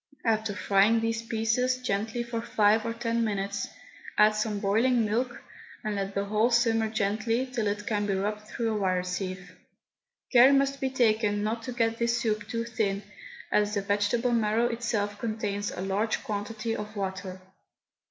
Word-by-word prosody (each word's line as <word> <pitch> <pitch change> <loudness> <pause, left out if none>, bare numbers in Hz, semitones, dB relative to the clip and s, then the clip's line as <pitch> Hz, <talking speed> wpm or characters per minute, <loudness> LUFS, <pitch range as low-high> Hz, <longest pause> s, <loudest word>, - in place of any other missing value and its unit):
After 220 -2 +1
frying 205 +2 +3
these 225 0 -1
pieces 230 +3 0
gently 225 0 -2
for 235 -1 -4
five 215 -1 +2
or 230 - -1
ten 230 0 0
minutes, 200 -2 -2 0.5
add 210 +1 +7
some 215 -1 -1
boiling 225 +4 +2
milk, 235 +4 -2 0.4
and 215 -2 -2
let 195 0 -3
the 200 0 0
whole 215 +3 +2
simmer 230 -2 +2
gently 220 +3 0
till 250 -5 -2
it 205 0 -2
can 205 -1 0
be 195 - +1
rubbed 210 +2 -3
through 225 0 -2
a - - -1
wire 185 -2 +1
sieve. 180 0 -5 0.8
Care 255 +3 +8
must 275 0 +2
be 265 - +1
taken 215 -5 +2
not 225 +2 -1
to 250 - -5
get 230 -1 0
this 235 0 +1
soup 215 -2 -1
too 230 0 -2
thin, 210 -4 -1 0.5
as 210 0 +2
the 200 - +1
vegetable 205 +5 +1
marrow 225 0 +2
itself 220 -3 -2
contains 210 -3 -2
a - - -6
large 200 +4 -1
quantity 215 +2 -3
of 210 +1 -6
water. 190 -1 -4
215 Hz, 170 wpm, -28 LUFS, 205-230 Hz, 0.8 s, Care